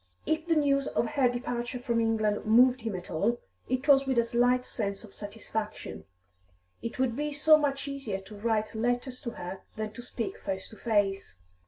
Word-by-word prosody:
If 315 Hz, +1 st, 0 dB
the 330 Hz, -, +3 dB
news 275 Hz, -2 st, +3 dB
of 235 Hz, -, 0 dB
her 275 Hz, -4 st, +3 dB
departure 245 Hz, +1 st, -3 dB
from 235 Hz, -2 st, 0 dB
England 220 Hz, -2 st, +1 dB
moved 245 Hz, +3 st, +5 dB
him 220 Hz, -3 st, -3 dB
at 180 Hz, -1 st, -7 dB
all, 235 Hz, +9 st, +1 dB, 0.3 s
it 255 Hz, +3 st, -1 dB
was 275 Hz, -1 st, +6 dB
with 260 Hz, -2 st, +1 dB
a 235 Hz, -, +5 dB
slight 245 Hz, +2 st, +2 dB
sense 200 Hz, -3 st, -3 dB
of 205 Hz, -3 st, -13 dB
satisfaction; 210 Hz, -, -5 dB, 0.8 s
it 230 Hz, -, -5 dB
would 255 Hz, -3 st, +1 dB
be 295 Hz, +2 st, -2 dB
so 300 Hz, +2 st, +6 dB
much 285 Hz, -2 st, 0 dB
easier 270 Hz, -9 st, -3 dB
to 205 Hz, +2 st, -12 dB
write 215 Hz, 0 st, 0 dB
letters 245 Hz, +3 st, -1 dB
to 235 Hz, -, -3 dB
her 190 Hz, -3 st, -7 dB
than 215 Hz, -1 st, -4 dB
to 240 Hz, -, -8 dB
speak 240 Hz, -2 st, -4 dB
face 190 Hz, -1 st, -4 dB
to -, -, -12 dB
face. 205 Hz, -, 0 dB
235 Hz, 190 wpm, -29 LUFS, 215-260 Hz, 0.8 s, was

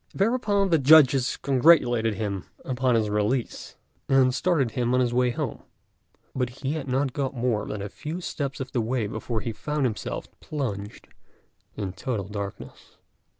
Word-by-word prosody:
Thereupon 205 Hz, -2 st, +1 dB
the 165 Hz, -, +4 dB
judges 135 Hz, -3 st, +5 dB
congratulated 125 Hz, -6 st, +4 dB
him 100 Hz, -2 st, -3 dB, 0.2 s
upon 130 Hz, -1 st, +1 dB
his 110 Hz, -2 st, +2 dB
release, 105 Hz, +4 st, -1 dB, 0.3 s
and 130 Hz, -1 st, +4 dB
started 140 Hz, -4 st, +1 dB
him 120 Hz, +1 st, 0 dB
on -, -, +3 dB
his 120 Hz, -1 st, +1 dB
way 125 Hz, 0 st, +3 dB
home; 120 Hz, -, -4 dB, 0.7 s
but 125 Hz, -2 st, -1 dB
he 135 Hz, +2 st, -4 dB
had 155 Hz, -3 st, -4 dB
not 130 Hz, 0 st, 0 dB
got 135 Hz, -1 st, -2 dB
more 115 Hz, -4 st, 0 dB
than 105 Hz, -2 st, -4 dB
a -, -, -3 dB
few 155 Hz, -, -6 dB
steps 140 Hz, -6 st, -4 dB
of 130 Hz, -1 st, -5 dB
the 120 Hz, -, 0 dB
way 115 Hz, 0 st, -1 dB
before 110 Hz, +2 st, -3 dB
he 115 Hz, -, -3 dB
found 150 Hz, +4 st, -2 dB
himself 115 Hz, -4 st, -3 dB
plunged 105 Hz, -9 st, -5 dB, 0.7 s
in 95 Hz, -3 st, -4 dB
total 100 Hz, 0 st, -3 dB
darkness. 100 Hz, -1 st, -8 dB
125 Hz, 160 wpm, -26 LUFS, 110-140 Hz, 0.7 s, judges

